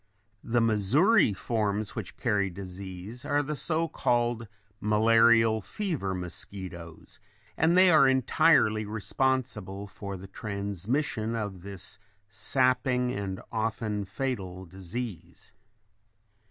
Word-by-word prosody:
The 120 Hz, 0 st, +1 dB
Missouri 115 Hz, -, +4 dB
forms 105 Hz, 0 st, -2 dB
which 105 Hz, -6 st, -6 dB
carry 105 Hz, -5 st, +1 dB
disease 95 Hz, +4 st, -8 dB
are 145 Hz, 0 st, +1 dB
the 150 Hz, +2 st, -3 dB
so 165 Hz, +3 st, 0 dB
called 120 Hz, -6 st, 0 dB, 0.3 s
malarial 115 Hz, +1 st, +4 dB
fever 150 Hz, -, -3 dB
mosquitoes, 90 Hz, -2 st, -7 dB, 0.4 s
and 165 Hz, +3 st, +3 dB
they 185 Hz, -1 st, +7 dB
are 155 Hz, -4 st, +6 dB
entirely 130 Hz, -4 st, +4 dB
responsible 110 Hz, -2 st, -2 dB
for 100 Hz, -1 st, -7 dB
the 95 Hz, -, -10 dB
transmission 105 Hz, -, -2 dB
of 100 Hz, -5 st, -4 dB
this 100 Hz, +1 st, -4 dB, 0.3 s
sapping 125 Hz, 0 st, +1 dB
and 100 Hz, -4 st, -4 dB
often 110 Hz, -2 st, -2 dB
fatal 95 Hz, -4 st, -4 dB
disease. 90 Hz, -1 st, -7 dB
110 Hz, 100 wpm, -28 LUFS, 95-125 Hz, 0.4 s, they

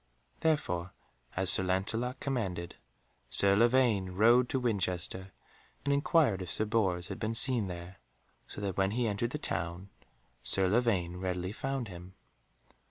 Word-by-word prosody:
Therefore 95 Hz, -, -1 dB, 0.4 s
as 95 Hz, -1 st, +4 dB
Sir -, -, +5 dB
Lancelot 100 Hz, +7 st, 0 dB
commanded, 95 Hz, -11 st, -3 dB, 0.5 s
Sir 100 Hz, 0 st, +5 dB
Lavaine 115 Hz, -4 st, +3 dB
rode 120 Hz, +5 st, +4 dB
to 130 Hz, -, 0 dB
Winchester 95 Hz, -5 st, -2 dB, 0.5 s
and 140 Hz, -, +2 dB
inquired 140 Hz, -, +2 dB
if 90 Hz, -, -6 dB
Sir 110 Hz, -, 0 dB
Bors 95 Hz, -5 st, 0 dB
had -, -, -6 dB
been 110 Hz, +1 st, -2 dB
seen 115 Hz, -3 st, +4 dB
there, 90 Hz, +1 st, -8 dB, 0.5 s
so -, -, -9 dB
that 100 Hz, -3 st, -3 dB
when 95 Hz, 0 st, +2 dB
he 125 Hz, -, +1 dB
entered 105 Hz, +3 st, -1 dB
the 150 Hz, -, -4 dB
town 85 Hz, -, -4 dB, 0.5 s
Sir 95 Hz, -1 st, +3 dB
Lavaine 95 Hz, -5 st, 0 dB
readily 90 Hz, 0 st, -3 dB
found 135 Hz, +1 st, -4 dB
him. 90 Hz, 0 st, -11 dB
100 Hz, 145 wpm, -31 LUFS, 90-120 Hz, 0.5 s, Sir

